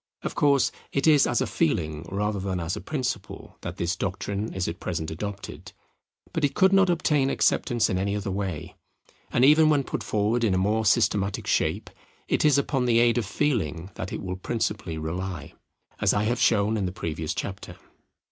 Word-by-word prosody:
Of - - -3
course 140 -3 +3 0.2
it 140 - 0
is 150 -3 +6
as - - +1
a - - +2
feeling 80 0 -1
rather 105 +1 -1
than 95 -1 -2
as 85 +2 -2
a 105 - -6
principle 125 -9 -4
that - - -6
this 85 +1 -1
doctrine 100 +3 -3
is 95 -1 -2
at 85 - -5
present 80 -3 -3
adopted; 100 +5 -7 0.6
but 160 - -2
it 145 - +1
could 190 0 +4
not 195 -1 +5
obtain 150 -5 +2
acceptance 120 -3 +2
in 95 - -1
any 100 +1 -1
other 100 -1 -3
way; 95 -5 -4 0.6
and 125 - +4
even 155 +2 +6
when 145 -2 +3
put - - -4
forward 110 +3 0
in 100 -5 +2
a - - +2
more 105 +3 +1
systematic 100 0 +2
shape, - - 0 0.4
it - - +1
is 150 -2 +5
upon 135 -2 0
the 120 -2 +3
aid 120 0 +4
of 110 - -3
feeling 100 - -1
that 95 - -6
it - - -5
will 90 -1 -4
principally 105 -4 -2
rely, 85 0 -5 0.5
as - - +2
I 100 - +1
have 120 +3 0
shown 110 0 +3
in 100 -3 -1
the - - -3
previous 80 -5 -4
chapter. 100 -2 -6
100 Hz, 195 wpm, -26 LUFS, 90-125 Hz, 0.6 s, is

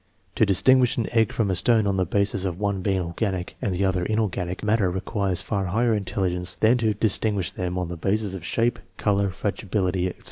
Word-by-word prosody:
To 110 - +2
distinguish 125 +6 +4
an 115 - 0
egg 115 -3 +2
from 105 -4 0
a - - 0
stone 110 +4 +3
on 100 -1 +1
the 95 -2 0
basis 100 0 0
of 90 -2 -3
one 100 -2 -1
being 95 0 0
organic, 90 +1 -3
the 95 0 0
other 95 -2 0
inorganic 95 -3 -2
matter 105 -2 +2
requires 95 0 -2
far 100 0 -2
higher 115 +5 +1
intelligence 95 -3 -1
than 115 +3 +3
to 110 -2 +1
distinguish 105 -3 0
them 90 -1 -3
on 90 -1 -2
the 85 0 -6
basis 100 +3 -1
of 95 -3 -7
shape, 115 +6 0 0.2
color, 100 -1 +1
fragibility, 95 -1 -1
etc. 90 - -7
100 Hz, 200 wpm, -24 LUFS, 90-110 Hz, 0.2 s, distinguish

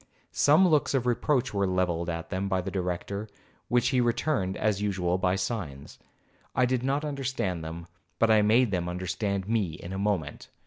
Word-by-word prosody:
Some 155 +6 +5
looks 150 -4 +2
of 125 -2 +1
reproach 125 +1 +1
were 100 -1 +1
levelled 90 -2 0
by 85 -1 -3
them 95 +3 -3
at 95 -1 0
the 95 - -3
Director, 95 +3 -3 0.4
which 120 0 +2
he 130 -1 +2
returned, 120 -5 0
as 105 -2 0
usual, 95 -3 0
by 95 -1 +2
signs. 95 - -4 0.6
I 125 - +4
did 125 0 0
not 140 +3 0
understand 130 - -2
them, 80 +1 -6 0.3
but 115 -1 +3
I 110 -1 +6
made 110 +2 +4
them 90 -2 -1
understand 95 +2 -2
me 105 -7 0
in 85 +3 -8
a 95 - -3
moment. 95 -7 -2
100 Hz, 180 wpm, -28 LUFS, 90-120 Hz, 0.6 s, I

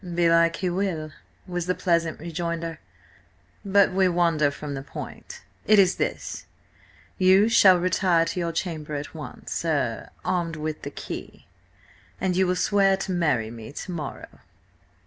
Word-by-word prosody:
"Belike 170 -1 +3
He 185 - -1
will," 175 -5 -2 0.3
was 175 -2 -4
the 180 - +1
pleasant 170 -3 0
rejoinder. 170 0 -4 0.8
"But 200 0 +4
we 190 -1 +3
wander 170 -4 +2
from 145 0 -6
the 135 - -4
point. 140 - -9 0.2
It 215 - +6
is 190 -2 +4
this: - - -3 0.7
you 190 +3 +6
shall 190 -5 +7
retire 175 -1 +2
to 180 - -3
your 170 -1 -1
chamber 155 -3 -4
at 145 0 -5
once–er–armed 160 +2 -3
with 155 0 -4
the 145 - -5
key–an 185 +5 -8
you 185 +1 +2
will 180 - +1
swear 195 +1 +3
to 195 - -4
marry 145 -11 +1
me 115 0 -9
to 180 - -7
morrow." 155 -5 -7
170 Hz, 140 wpm, -25 LUFS, 155-185 Hz, 0.8 s, shall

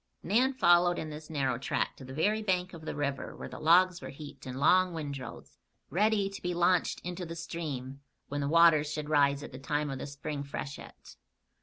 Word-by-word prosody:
Nan 245 +8 +3
followed 175 -5 +5
in 155 - -4
this 150 +1 -9
narrow 135 -5 0
track - - -1
to - - -11
the 130 - -9
very 205 +10 +1
bank 185 -3 0
of 160 -2 -10
the - - -4
river 140 -2 -3
where - - -7
the - - -9
logs 175 +3 +4
were - - -7
heaped 145 -2 -10
in 130 0 -5
long 180 +5 +4
windrows, 140 -6 -7 0.3
ready 205 +2 +2
to 195 0 -8
be 180 0 -2
launched 175 0 +2
into 180 +1 -5
the 165 -1 -6
stream 140 -5 -5 0.3
when 145 +1 -3
the 140 - -1
waters 155 -2 +5
should 150 0 -4
rise 140 -1 +3
at - - -8
the 130 - -9
time 145 +1 -1
of 135 - -5
the - - -5
spring 140 +1 -5
freshet. 140 0 -8
155 Hz, 205 wpm, -30 LUFS, 140-175 Hz, 0.3 s, followed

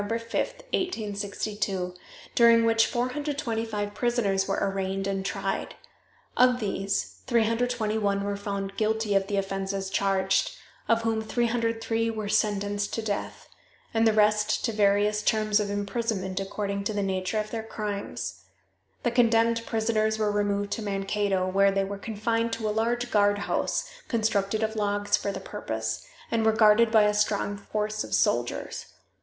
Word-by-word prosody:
5, 205 - -5
1862, 215 - -2 0.4
during 230 -1 +6
which 225 0 +4
425 240 -5 -2
prisoners 205 -6 +1
were 195 - 0
arraigned 195 0 -1
and 195 -1 -1
tried. - - -3 0.6
Of 250 0 +4
these 195 -2 -2
321 220 -3 +1
were 200 0 -2
found 200 -1 -4
guilty 220 -1 +1
of 195 0 +2
the 200 -1 -1
offenses 195 0 -2
charged, 195 - +1 0.3
of 230 0 +3
whom 225 -1 0
303 230 0 0
were 215 -2 -3
sentenced 205 -1 0
to 225 - -3
death, 205 -2 -4 0.5
and 225 0 +3
the - - +5
rest 210 0 +3
to 230 - 0
various 210 0 +2
terms 215 0 +2
of 205 -1 -1
imprisonment 200 -2 -2
according 200 0 -3
to 215 - -1
the 205 -1 -1
nature 190 +2 -1
of 215 0 -4
their 225 - -2
crimes. 200 - -5 0.6
The 240 - +1
condemned 230 -1 +3
prisoners 220 -1 +1
were 215 -1 +1
removed 205 0 0
to - - -2
Mankato, 195 -1 0
where 195 +1 +4
they 195 0 +1
were 195 +1 -5
confined 230 +2 -1
in 220 - -4
a 215 - +1
large 240 +3 0
guardhouse, 205 -1 +1 0.2
constructed 215 -2 0
of 220 0 -1
logs 205 -1 +1
for 200 - -2
the - - -5
purpose, 110 - -4 0.3
and 230 -1 +1
were 220 0 +4
guarded 220 +1 +5
by 220 -2 +6
a 210 0 +3
strong 205 -1 0
force 215 +1 -3
of - - -1
soldiers. - - 0
210 Hz, 150 wpm, -27 LUFS, 200-225 Hz, 0.6 s, during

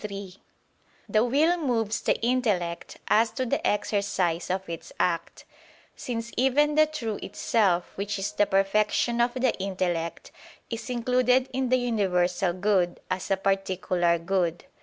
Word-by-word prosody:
3: 200 -3 -7 0.7
The 215 0 +3
will 300 +8 +3
moves 225 -7 0
the - - +1
intellect 215 -9 -1
as 225 +1 +4
to 260 - -3
the 230 - -1
exercise 190 -5 0
of 190 +1 -2
its 170 -1 -7
act; 170 -2 -1 0.5
since 235 -1 -5
even 275 +4 +3
the 310 +1 +5
true 230 -9 -4
itself 190 -6 0
which 200 +1 -3
is 195 +2 -2
the 205 - +2
perfection 210 +4 +2
of 240 +1 +1
the 255 -1 +2
intellect, 180 -3 -3 0.4
is 230 +2 -5
included 250 +1 +2
in 260 -1 -1
the 255 - +4
universal 190 -6 +1
good, 185 -1 +1
as 185 0 -2
a 195 - +2
particular 190 -3 +1
good. 170 0 -1
205 Hz, 140 wpm, -26 LUFS, 185-245 Hz, 0.7 s, the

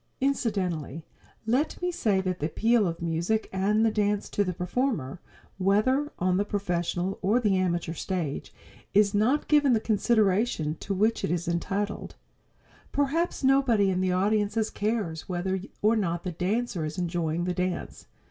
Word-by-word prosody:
Incidentally, 185 - -1 0.4
let 255 +7 0
me 360 0 -1
say 210 - +1
that 185 -1 -2
the 150 - 0
appeal 225 +4 +2
of 170 0 -4
music 170 +7 0
and 210 +4 +2
the 225 - +3
dance 210 -1 0
to 205 - +1
the 185 - -2
performer, 180 - -2 0.4
whether 255 +10 +2
on 180 0 +1
the 200 - +2
professional 180 -2 -2
or 215 +6 +3
the 210 -5 +2
amateur 175 -3 0
stage, 170 -4 -3 0.4
is 205 0 +5
not 230 +8 +2
given 290 -4 +4
the 225 - +3
consideration 215 -6 +1
to 200 - -3
which 215 +4 +1
it - - 0
is 170 0 -1
entitled. 195 +4 -2 0.8
Perhaps 290 +4 0
nobody 255 -7 +4
in 185 0 0
the 185 -1 +1
audience 205 +3 +1
cares 205 -7 -2
whether 185 +1 -1 0.2
or 215 +2 +4
not 175 -5 -1
the 180 - -3
dancer 195 +2 -1
is 155 0 -4
enjoying 170 -2 -1
the 180 0 -1
dance. 180 0 -3
195 Hz, 155 wpm, -27 LUFS, 175-225 Hz, 0.8 s, is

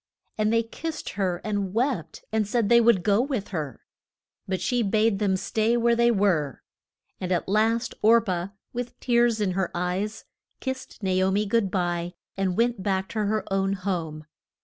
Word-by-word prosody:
And 215 0 +1
they 230 0 +3
kissed 315 +7 -5
her 185 -3 -1
and 205 -2 -2
wept 240 - -1
and 215 -2 +1
said 220 -1 +1
they 235 0 +7
would 230 -6 +4
go 205 +3 +3
with 255 -6 -2
her. 150 - -4 0.7
But 190 -1 -1
she 245 -1 0
bade 215 0 +2
them 195 -3 +2
stay 225 +4 +1
where 235 0 +3
they 235 0 +4
were, 190 - +1 0.6
and 185 0 -3
at 175 - 0
last 225 +4 +1
Or 230 +2 +6
pah, 180 -5 -2 0.3
with 245 0 -5
tears 235 -2 +2
in 205 -3 +1
her 185 -1 -1
eyes, 185 +5 -2 0.3
kissed 260 -4 -6
Na 190 - +1
o 190 - +3
mi 205 +2 +1
good 210 -1 +1
bye 175 -1 -1 0.2
and 190 -2 -1
went 235 -2 +1
back 190 -1 -1
to 215 -2 -1
her 215 +1 0
own 195 0 +1
home. 170 -5 -3
205 Hz, 180 wpm, -26 LUFS, 185-230 Hz, 0.7 s, they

